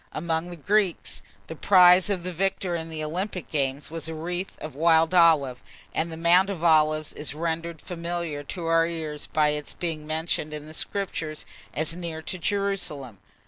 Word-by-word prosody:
Among 165 Hz, +1 st, -2 dB
the 175 Hz, -, -7 dB
Greeks, 195 Hz, +2 st, 0 dB, 0.2 s
the 160 Hz, -, -8 dB
prize 180 Hz, +2 st, +6 dB
of 190 Hz, -4 st, -1 dB
the 180 Hz, -, -3 dB
victor 185 Hz, 0 st, -1 dB
in 165 Hz, -1 st, -4 dB
the 155 Hz, -1 st, -4 dB
Olympic 180 Hz, +4 st, -4 dB
games 140 Hz, 0 st, -1 dB
was 165 Hz, -1 st, -4 dB
a 160 Hz, -, -5 dB
wreath 175 Hz, +4 st, -4 dB
of 155 Hz, -, -7 dB
wild 165 Hz, +3 st, +3 dB
olive; 155 Hz, -8 st, +4 dB, 0.3 s
and 165 Hz, +1 st, -1 dB
the 160 Hz, -, -7 dB
"Mount 175 Hz, +4 st, +4 dB
of 180 Hz, -5 st, -4 dB
Olives" 155 Hz, -2 st, +3 dB
is 150 Hz, -1 st, -4 dB
rendered 165 Hz, 0 st, -3 dB
familiar 170 Hz, -3 st, -4 dB
to 170 Hz, +3 st, -5 dB
our 165 Hz, 0 st, +3 dB
ears 155 Hz, -3 st, -5 dB
by 150 Hz, -1 st, +2 dB
its 150 Hz, -1 st, -4 dB
being 160 Hz, -3 st, -4 dB
mentioned 155 Hz, -1 st, -1 dB
in 150 Hz, 0 st, -7 dB
the 155 Hz, -, -11 dB
Scriptures 160 Hz, -4 st, -3 dB, 0.3 s
as 155 Hz, +2 st, -1 dB
near 165 Hz, -2 st, -5 dB
to 185 Hz, -, -3 dB
Jerusalem. 170 Hz, -, -1 dB
165 Hz, 180 wpm, -26 LUFS, 155-175 Hz, 0.3 s, prize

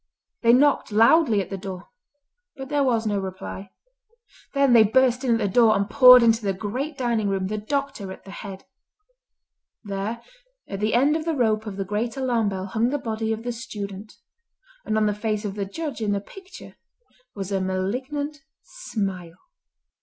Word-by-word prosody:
They 230 Hz, -, +5 dB
knocked 275 Hz, -1 st, +3 dB
loudly 225 Hz, +1 st, +4 dB
at 195 Hz, -, -8 dB
the 195 Hz, -, -4 dB
door, 190 Hz, -1 st, -8 dB, 0.7 s
but 265 Hz, -1 st, -8 dB
there 290 Hz, -1 st, +1 dB
was 230 Hz, -4 st, +1 dB
no 205 Hz, -2 st, 0 dB
reply. 190 Hz, 0 st, -7 dB, 0.9 s
Then 275 Hz, -2 st, +4 dB
they 230 Hz, -, +8 dB
burst 250 Hz, +4 st, +3 dB
in 235 Hz, -3 st, +2 dB
the 210 Hz, -3 st, 0 dB
door, 220 Hz, +2 st, +4 dB
and 200 Hz, 0 st, 0 dB
poured 250 Hz, +1 st, +8 dB
into 225 Hz, 0 st, +3 dB
the 200 Hz, -2 st, -1 dB
great 255 Hz, +10 st, -4 dB
dining 235 Hz, -5 st, 0 dB
room, 195 Hz, -1 st, -1 dB
the 215 Hz, +2 st, -3 dB
doctor 275 Hz, -4 st, -3 dB
at -, -, -11 dB
the 195 Hz, -, -11 dB
head. 195 Hz, -1 st, -9 dB, 1.2 s
There 205 Hz, +3 st, -4 dB, 0.4 s
at 195 Hz, -, -6 dB
the 215 Hz, +2 st, 0 dB
end 280 Hz, +5 st, +3 dB
of 320 Hz, 0 st, -3 dB
the 330 Hz, -2 st, -1 dB
rope 220 Hz, -4 st, +1 dB
of 200 Hz, -2 st, -6 dB
the 195 Hz, -, -3 dB
great 220 Hz, +5 st, -3 dB
alarm 240 Hz, -5 st, +1 dB
bell 190 Hz, -1 st, -4 dB
hung 225 Hz, +4 st, 0 dB
the 290 Hz, -, -1 dB
body 225 Hz, -3 st, -3 dB
of 220 Hz, 0 st, -3 dB
the 245 Hz, -, -2 dB
student, 210 Hz, -4 st, -7 dB, 0.7 s
and 215 Hz, -, 0 dB
on 215 Hz, -, +2 dB
the 210 Hz, -, +1 dB
face 210 Hz, 0 st, -3 dB
of 200 Hz, -, -3 dB
the 200 Hz, -1 st, -3 dB
Judge 290 Hz, +4 st, -5 dB
in 210 Hz, -2 st, 0 dB
the 200 Hz, -, 0 dB
picture 380 Hz, -, -13 dB, 0.6 s
was 195 Hz, -1 st, -5 dB
a 195 Hz, -1 st, 0 dB
malignant 255 Hz, +11 st, -3 dB, 0.2 s
smile. 195 Hz, -, -5 dB
220 Hz, 185 wpm, -24 LUFS, 200-255 Hz, 1.2 s, they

